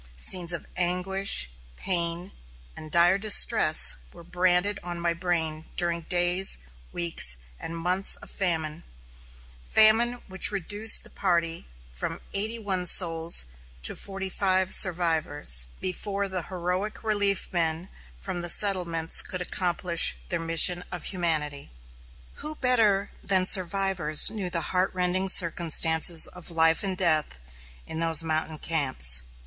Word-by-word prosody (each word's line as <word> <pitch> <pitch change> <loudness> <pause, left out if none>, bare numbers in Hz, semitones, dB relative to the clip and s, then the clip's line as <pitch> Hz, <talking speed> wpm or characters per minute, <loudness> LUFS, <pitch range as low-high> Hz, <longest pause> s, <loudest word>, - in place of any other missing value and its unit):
Scenes 175 - +2
of 170 - -4
anguish, 180 - +3 0.3
pain, 175 0 -4 0.4
and 155 - -12
dire 175 +4 +2
distress 210 0 +5
were - - -15
branded 180 +3 -1
on 175 0 -6
my 170 0 -2
brain 165 -3 -5
during 170 -1 0
days, 175 +3 +1 0.3
weeks, 165 - -1 0.2
and 165 - -9
months 180 +3 0
of - - -11
famine, 165 -4 -4 0.8
famine 220 - +2
which 190 -1 +3
reduced 205 +3 +1
the - - -11
party 170 -3 -2 0.2
from - - -7
eighty 215 +4 -1
one 190 -5 -2
souls 165 - +4 0.4
to - - +3
forty 195 -1 -4
five 190 -1 -1
survivors, 160 - +1
before 200 +2 -5
the 190 -2 -4
heroic 185 +4 -5
relief 205 -2 -1
men 165 0 -4 0.3
from 175 - -7
the 175 - -4
settlements 170 -5 +2
could 185 - -3
accomplish 175 -1 +1
their 170 - -3
mission 165 +2 +4
of 175 -3 -7
humanity. 155 -6 -5 0.7
Who 305 0 -3
better 220 -7 0
than 190 -2 +2
survivors 185 -4 +1
knew 200 -5 -6
the 170 -1 -4
heart 185 +1 +1
rending 185 +1 -1
circumstances 165 -2 +3
of 180 -1 -8
life 165 -1 0
and 190 -2 -2
death 155 - +1 0.5
in 160 - -8
those 165 -1 +4
mountain 155 -1 -4
camps? 130 - +1
175 Hz, 130 wpm, -24 LUFS, 165-190 Hz, 0.8 s, distress